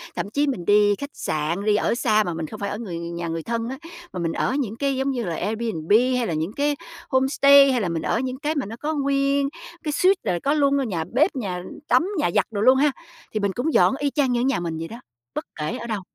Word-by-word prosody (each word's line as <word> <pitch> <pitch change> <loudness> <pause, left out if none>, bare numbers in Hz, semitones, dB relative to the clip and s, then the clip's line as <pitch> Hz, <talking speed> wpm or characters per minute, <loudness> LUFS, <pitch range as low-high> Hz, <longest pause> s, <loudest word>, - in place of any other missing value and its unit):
Thậm 200 - -3
chí 285 +7 +1
mình 205 -11 -2
đi 205 +1 +4
khách 280 +6 -6
sạn, 160 +6 -2
đi 210 -1 +3
ở 210 - +1
xa 215 -3 +3
mà 175 - -3
mình 160 -1 -4
không 215 - -9
phải 200 -1 -2
ở 205 - -4
người 190 -7 -5
nhà 170 0 -5
người 165 0 -3
thân 230 +2 -2
á, 265 - -5 0.4
mà - - -4
mình 165 -1 -1
ở 255 - 0
những 225 -6 -2
cái 275 +2 0
giống 265 +1 0
như 245 -3 -2
là 170 -5 -3
Airbnb 215 -7 -3 0.3
hay 245 - 0
là 170 - -2
những 160 +6 -2
cái 290 +2 0 0.3
homestay 275 +1 +6
hay 250 -2 +1
là 185 - -1
mình 165 -1 -2
ở 220 - 0
những 255 0 -3
cái 305 +1 -1
mà 285 - -1
nó 215 +3 -7
có 300 +6 -3
nguyên 275 0 +1 0.3
cái 305 - -1
suite 370 +6 +3
là 175 - 0
có 285 - +2
luôn 280 -4 +2
nhà 165 -5 -1
bếp, 305 +8 +3
nhà 185 -8 -3 0.2
tắm, 335 - +3
nhà 300 - +1
giặt - - +4
đồ 205 -2 -2
luôn 255 +4 +6
ha, 290 +2 +3 0.4
thì 215 - -1
mình 200 -1 0
cũng 285 +8 -1
dọn - - +4
y 290 - +1
chang 275 -3 +1
như 240 -1 +1
ở - - +1
nhà 270 0 +1
mình 165 -2 -3
vậy 165 +1 -5
đó. 230 +5 -9 0.4
Bất - - -3
kể 150 0 -3
ở 235 - -7
đâu. 215 -4 -2
235 Hz, 270 wpm, -23 LUFS, 180-275 Hz, 0.4 s, homestay